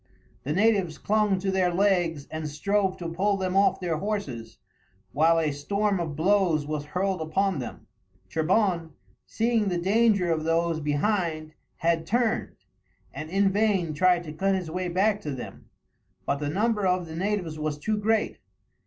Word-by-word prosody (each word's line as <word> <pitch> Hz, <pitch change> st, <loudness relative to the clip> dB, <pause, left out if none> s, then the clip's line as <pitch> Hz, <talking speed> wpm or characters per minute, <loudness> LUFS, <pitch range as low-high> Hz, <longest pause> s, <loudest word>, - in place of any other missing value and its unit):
The 145 Hz, -, -4 dB
natives 195 Hz, -2 st, +2 dB
clung 210 Hz, -2 st, +1 dB
to 195 Hz, 0 st, 0 dB
their 185 Hz, -2 st, +2 dB
legs 175 Hz, -6 st, +1 dB
and 155 Hz, -1 st, -4 dB
strove 190 Hz, +5 st, 0 dB
to 175 Hz, -3 st, -5 dB
pull 195 Hz, +4 st, 0 dB
them 185 Hz, -1 st, -2 dB
off 195 Hz, +1 st, +3 dB
their 175 Hz, -4 st, -1 dB
horses, 150 Hz, -, -4 dB, 0.5 s
while 160 Hz, +3 st, +3 dB
a 160 Hz, -2 st, +1 dB
storm 200 Hz, +7 st, -1 dB
of 160 Hz, -4 st, -3 dB
blows 170 Hz, -2 st, +2 dB
was 150 Hz, -1 st, -3 dB
hurled 185 Hz, +3 st, -1 dB
upon 180 Hz, +2 st, 0 dB
them. 125 Hz, -, -7 dB, 0.4 s
Trebon, 170 Hz, -1 st, 0 dB, 0.3 s
seeing 225 Hz, -2 st, +1 dB
the 180 Hz, -2 st, 0 dB
danger 200 Hz, 0 st, +2 dB
of 160 Hz, -1 st, 0 dB
those 165 Hz, 0 st, +1 dB
behind, 155 Hz, +1 st, -1 dB, 0.2 s
had 165 Hz, -1 st, 0 dB
turned, 235 Hz, 0 st, 0 dB, 0.6 s
and 155 Hz, +3 st, -6 dB
in 195 Hz, +2 st, +2 dB
vain 195 Hz, -6 st, +1 dB
tried 180 Hz, +2 st, +3 dB
to 155 Hz, -3 st, -8 dB
cut 195 Hz, +4 st, +1 dB
his 180 Hz, -4 st, -4 dB
way 180 Hz, +1 st, -2 dB
back 200 Hz, +4 st, +1 dB
to 170 Hz, -, -5 dB
them; 125 Hz, -, -9 dB, 0.6 s
but -, -, 0 dB
the 145 Hz, 0 st, -3 dB
number 210 Hz, +3 st, +1 dB
of 180 Hz, -1 st, +1 dB
the 160 Hz, -1 st, -8 dB
natives 180 Hz, -4 st, -2 dB
was 150 Hz, -1 st, -2 dB
too 210 Hz, +8 st, -1 dB
great. 220 Hz, +1 st, 0 dB
180 Hz, 165 wpm, -26 LUFS, 155-200 Hz, 0.6 s, off